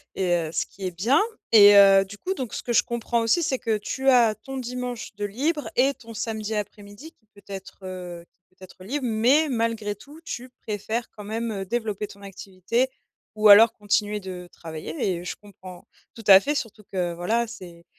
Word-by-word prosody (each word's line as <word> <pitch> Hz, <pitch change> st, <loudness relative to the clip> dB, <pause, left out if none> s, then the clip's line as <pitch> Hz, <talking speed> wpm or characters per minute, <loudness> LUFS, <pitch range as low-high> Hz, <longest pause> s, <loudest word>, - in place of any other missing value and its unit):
et 185 Hz, -2 st, -1 dB
heu, 165 Hz, -2 st, -1 dB
ce -, -, 0 dB
qui 195 Hz, -, -9 dB
est 185 Hz, -, -2 dB
bien 230 Hz, -, +2 dB, 0.3 s
et 205 Hz, -2 st, +9 dB
heu, 195 Hz, -1 st, +7 dB
du 200 Hz, +1 st, -11 dB
coup 375 Hz, -, -3 dB
donc 255 Hz, -, -6 dB
ce -, -, -5 dB
que 240 Hz, -, -3 dB
je -, -, +5 dB
comprends 235 Hz, 0 st, -2 dB
aussi, 230 Hz, +10 st, +2 dB
c'est 260 Hz, -3 st, -1 dB
que 225 Hz, -3 st, 0 dB
tu 265 Hz, +6 st, -4 dB
as 235 Hz, -4 st, +5 dB
ton 270 Hz, +5 st, -8 dB
dimanche 250 Hz, -2 st, -5 dB
de 205 Hz, -, -3 dB
libre 290 Hz, +9 st, -2 dB
et 270 Hz, +3 st, +3 dB
ton 230 Hz, -3 st, -13 dB
samedi 220 Hz, -1 st, -4 dB
après-midi 210 Hz, +7 st, -7 dB
qui 220 Hz, -, -40 dB
peut 200 Hz, -, -18 dB
être, 195 Hz, -1 st, -9 dB
heu, 180 Hz, -2 st, -7 dB, 0.2 s
qui -, -, -36 dB
peut 185 Hz, -, -17 dB
être 185 Hz, 0 st, -14 dB
libre 270 Hz, +5 st, -3 dB
mais 250 Hz, +7 st, +3 dB
malgré 230 Hz, -4 st, -1 dB
tout, 290 Hz, +10 st, -15 dB
tu 250 Hz, -5 st, -6 dB, 0.2 s
préfères 220 Hz, +3 st, -3 dB
quand 210 Hz, -, -11 dB
même, 225 Hz, +2 st, -3 dB
heu, 195 Hz, -2 st, -4 dB
développer 215 Hz, -1 st, -3 dB
ton 200 Hz, 0 st, -15 dB
activité 195 Hz, +5 st, -2 dB, 0.5 s
ou 215 Hz, 0 st, +4 dB
alors 220 Hz, +3 st, +9 dB
continuer 210 Hz, 0 st, -1 dB
de 180 Hz, -1 st, -8 dB
travailler 160 Hz, -1 st, -8 dB, 0.2 s
et -, -, -9 dB
je -, -, -4 dB
comprends 190 Hz, -3 st, -14 dB, 0.3 s
tout 225 Hz, -, -12 dB
à 190 Hz, -2 st, +10 dB
fait, 285 Hz, +9 st, -1 dB
surtout 225 Hz, -5 st, -5 dB
que 180 Hz, -2 st, -1 dB
voilà, 225 Hz, +7 st, 0 dB
c'est 180 Hz, -7 st, -11 dB
215 Hz, 205 wpm, -24 LUFS, 195-240 Hz, 0.5 s, à